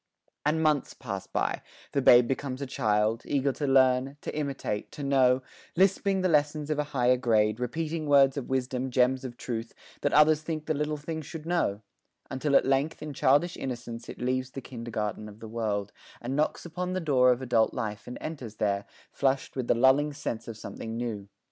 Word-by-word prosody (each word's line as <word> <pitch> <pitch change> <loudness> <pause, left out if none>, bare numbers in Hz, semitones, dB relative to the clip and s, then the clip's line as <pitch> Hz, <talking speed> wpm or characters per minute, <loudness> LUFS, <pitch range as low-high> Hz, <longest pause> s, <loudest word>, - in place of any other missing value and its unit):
And 160 +2 +2
months 150 -3 +1
pass 100 -7 -6
by - - -1 0.3
the 140 - +1
babe 120 -2 +7
becomes 135 0 -3
a 140 - -3
child, 110 -3 +1
Eager 140 0 +1
to 145 +2 -3
learn, 130 +1 +3
to - - -5
imitate, 135 -8 -3
to 145 - -6
know, 130 -2 +3 0.3
Lisping 195 +1 +2
the 185 - +2
lessons 150 -1 +1
of 150 - 0
a 150 - +1
higher 125 -3 +2
grade, 110 -3 +2
Repeating 155 +5 -3
words 140 -2 +5
of 140 -4 -5
wisdom, 130 0 -1
gems 130 +1 +2
of 120 -2 -7
truth 115 -2 -5 0.3
That - - +1
others 150 +1 +5
think 155 -1 -4
the 155 - 0
little 150 +1 -1
thing 160 +2 -5
should 155 +1 -8
know; 165 - 0 0.5
Until 140 +2 0
at - - +5
length 135 +5 0
in 150 -1 -5
childish 145 +7 +3
innocence 120 -2 -6
It - - -7
leaves 130 +1 -1
the 135 - -7
kindergarten 110 -4 -5
of 105 +1 -14
the 110 - -8
world, 105 -3 -2 0.3
And 125 +3 -4
knocks 150 +3 0
upon 180 +2 -3
the 185 - 0
door 130 -6 +4
of 125 +1 -1
adult 115 -3 +2
life, 105 -1 -5
And 125 - -6
enters 130 -9 -6
there, 100 -1 0 0.3
flushed 135 -1 0
with 130 -3 -3
the - - +3
lulling 135 +5 +4
sense 115 -6 -5
Of 115 -2 -7
something 110 +1 -6
new. 110 -5 -4
130 Hz, 195 wpm, -28 LUFS, 120-150 Hz, 0.5 s, babe